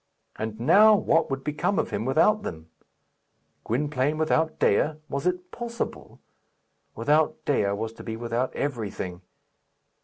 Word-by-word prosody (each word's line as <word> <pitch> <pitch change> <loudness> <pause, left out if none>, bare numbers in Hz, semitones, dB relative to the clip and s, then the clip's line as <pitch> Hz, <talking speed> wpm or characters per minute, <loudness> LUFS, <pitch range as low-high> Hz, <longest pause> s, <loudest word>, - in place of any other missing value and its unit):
And, 110 0 -5
now, 205 - +6
what 165 -5 +2
would 135 -1 -3
become 150 +7 -1
of - - 0
him 105 +2 -2
without 165 +11 +3
them? 80 - -7 0.9
Gwynplaine 145 +3 0
without 160 0 +1
Dea! 150 +9 +2 0.2
Was 140 +5 -2
it 180 0 -2
possible? 235 -1 -6 0.8
Without 150 +6 +1
Dea 100 -8 +1
was 110 +2 -4
to - - -11
be 110 - -4
without 120 +2 -2
everything. 105 -9 -4
140 Hz, 130 wpm, -26 LUFS, 115-160 Hz, 0.9 s, now